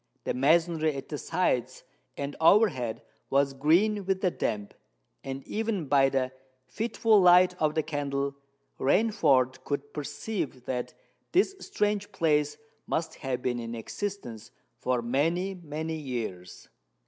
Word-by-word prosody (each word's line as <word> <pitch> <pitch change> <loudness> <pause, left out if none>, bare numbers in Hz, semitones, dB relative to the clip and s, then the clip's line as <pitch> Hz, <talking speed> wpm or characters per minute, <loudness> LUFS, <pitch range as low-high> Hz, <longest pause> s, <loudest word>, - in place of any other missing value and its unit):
The - - -1
masonry 160 +2 +2
at 135 - -7
the 150 - -4
sides 165 -8 -1 0.3
and 140 0 -4
overhead 160 - +3 0.3
was 140 0 +2
green 180 +10 +3
with 190 0 0
the 185 - +2
damp; 105 -8 -3 0.5
and, 135 0 -6
even 215 -6 -2
by 135 -1 +4
the 130 -1 0 0.3
fitful 220 - +2
light 180 0 +6
of 155 -1 +2
the 155 - +1
candle, 140 -2 -2 0.4
Rainford 140 - +3
could 145 0 -4
perceive 145 - -4
that 125 -1 -3 0.4
this 385 +2 +3
strange 210 - -1
place 150 -5 +1 0.3
must 160 0 -1
have 130 -2 -2
been 120 -1 0
in 115 0 -5
existence 120 - -5 0.3
for 125 -2 0
many—many 160 +3 -1
years. 115 - -6
150 Hz, 125 wpm, -28 LUFS, 130-185 Hz, 0.5 s, light